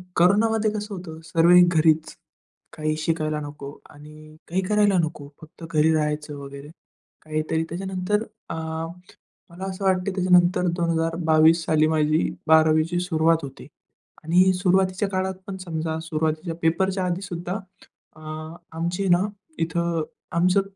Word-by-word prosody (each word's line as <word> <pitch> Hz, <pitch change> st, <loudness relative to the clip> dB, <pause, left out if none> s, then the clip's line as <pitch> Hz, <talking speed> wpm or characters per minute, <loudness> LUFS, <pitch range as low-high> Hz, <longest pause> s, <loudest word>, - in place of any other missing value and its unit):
कोरोनामध्ये 215 Hz, +5 st, +3 dB
कसं 210 Hz, -1 st, -5 dB
होतं, 160 Hz, -3 st, -8 dB
सर्वही 170 Hz, +2 st, +5 dB
घरीच. 160 Hz, -2 st, +2 dB, 0.6 s
काही 155 Hz, 0 st, -2 dB
शिकायला 155 Hz, -1 st, -1 dB
नको 145 Hz, -1 st, -8 dB, 0.2 s
आणि 155 Hz, +1 st, -14 dB
काही 185 Hz, +3 st, 0 dB
करायला 205 Hz, -1 st, +3 dB
नको. 155 Hz, -3 st, -3 dB
फक्त 160 Hz, +1 st, -14 dB
घरी 155 Hz, 0 st, +3 dB
राहायचं 150 Hz, -1 st, -2 dB
वगैरे 140 Hz, +1 st, -9 dB, 0.6 s
काहीतरी. 155 Hz, +1 st, -1 dB
त्याच्यानंतर 190 Hz, +3 st, -2 dB, 0.3 s
अ, -, -, -3 dB, 0.9 s
मला 175 Hz, +3 st, -10 dB
असं 190 Hz, +1 st, -6 dB
वाटतं 185 Hz, -1 st, +2 dB
की 195 Hz, -, -1 dB
त्याच्यानंतर 180 Hz, -1 st, +3 dB
2022 165 Hz, -1 st, +2 dB
साली 155 Hz, 0 st, +3 dB
माझी 155 Hz, 0 st, +1 dB, 0.2 s
12वीची 160 Hz, +2 st, +4 dB
सुरुवात 165 Hz, -2 st, +1 dB
होती 135 Hz, -, -9 dB, 0.6 s
आणि 180 Hz, +4 st, +4 dB
सुरुवातीच्या 185 Hz, +1 st, +1 dB
काळात 190 Hz, 0 st, -1 dB
पण, 195 Hz, -, -5 dB
समजा 160 Hz, -3 st, -4 dB
सुरुवातीच्या 160 Hz, +1 st, -2 dB
पेपरच्या 190 Hz, +3 st, +1 dB
आधी 180 Hz, +1 st, -2 dB
सुद्धा 180 Hz, +1 st, -4 dB, 0.6 s
अ, -, -, -15 dB, 0.6 s
आमची 180 Hz, +4 st, -1 dB
ना 175 Hz, -, +5 dB, 0.4 s
इथं, 165 Hz, 0 st, -1 dB, 0.3 s
आमचं 180 Hz, +3 st, +3 dB
170 Hz, 125 wpm, -24 LUFS, 155-185 Hz, 0.9 s, सर्वही